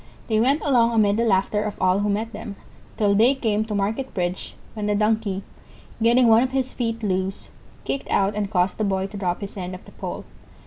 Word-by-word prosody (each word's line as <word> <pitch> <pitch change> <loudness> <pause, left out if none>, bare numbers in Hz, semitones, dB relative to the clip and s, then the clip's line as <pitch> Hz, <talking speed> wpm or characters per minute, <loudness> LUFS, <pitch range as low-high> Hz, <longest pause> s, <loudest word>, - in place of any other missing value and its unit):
They 215 -1 +2
went 275 +7 +2
along 235 -5 +3
amid 210 -2 +3
the 235 - +2
laughter 205 0 +2
of 210 -1 -4
all 185 +1 +3
who 205 0 0
met 220 +3 -2
them 200 - -7 0.4
till 205 -2 +3
they 230 +7 +4
came 215 -5 0
to 215 -2 -4
Market 220 +7 -1
Bridge, 180 -1 -3 0.2
when 210 -2 -3
the 210 - +1
Donkey, 210 -2 0 0.6
getting 240 +2 +5
one 225 0 +6
of 260 +1 -1
his 265 -1 -1
feet 230 -2 -3
loose, 190 -1 -2 0.4
kicked 275 - -3
out 195 +1 +2
and 205 -1 -2
caused 180 +1 0
the - - +1
Boy 190 -2 0
to 195 +1 -7
drop 180 -2 -2
his 200 - -6
end 185 -1 -5
of 185 - -13
the - - -14
pole. - - -6
210 Hz, 220 wpm, -23 LUFS, 195-230 Hz, 0.6 s, one